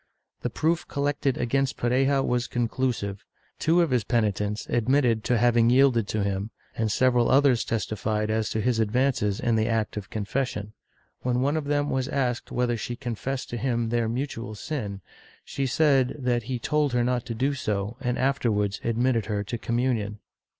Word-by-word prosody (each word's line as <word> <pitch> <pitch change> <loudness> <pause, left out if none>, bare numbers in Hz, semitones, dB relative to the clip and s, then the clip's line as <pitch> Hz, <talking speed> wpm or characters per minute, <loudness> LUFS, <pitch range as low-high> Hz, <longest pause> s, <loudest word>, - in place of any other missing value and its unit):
The - - -1
proof 165 +2 0
collected 140 -2 0
against 135 +2 0
Pareja 135 +3 +2
was 125 0 0
conclusive. 120 -4 -2 0.4
Two 170 +2 +3
of 165 - -1
his 125 -3 +2
penitents 105 -3 0
admitted 120 -2 +2
to 125 - +2
having 120 0 +4
yielded 125 -4 +4
to 105 0 -1
him, 100 +1 -2 0.3
and 110 -1 0
several 125 0 +3
others 135 -4 +4
testified 110 0 -1
as 110 -1 0
to 110 - -1
his 120 0 +1
advances 110 -2 +1
in 115 -2 +1
the 110 0 +1
act 110 -2 -1
of 100 -1 -6
confession. 105 -1 -3 0.5
When 125 0 0
one 140 +3 +1
of 155 -2 -1
them 145 0 0
was 130 0 0
asked 130 -4 -1
whether 125 -1 0
she 120 +2 -4
confessed 125 +3 -4
to 120 - -3
him 120 -2 0
their 115 -1 0
mutual 115 -3 -4
sin, 105 -6 -4 0.4
she 135 -1 -2
said 135 -1 +3
that 125 -3 0
he 130 - -1
told 150 +2 0
her 120 -1 +2
not 125 -1 0
to 115 - -3
do 135 +5 +1
so, 105 -4 -2
and 125 -1 -1
afterwards 110 -7 0
admitted 115 -1 +1
her 105 -2 -1
to 105 - -4
communion. 115 -4 -1
120 Hz, 175 wpm, -26 LUFS, 110-130 Hz, 0.5 s, having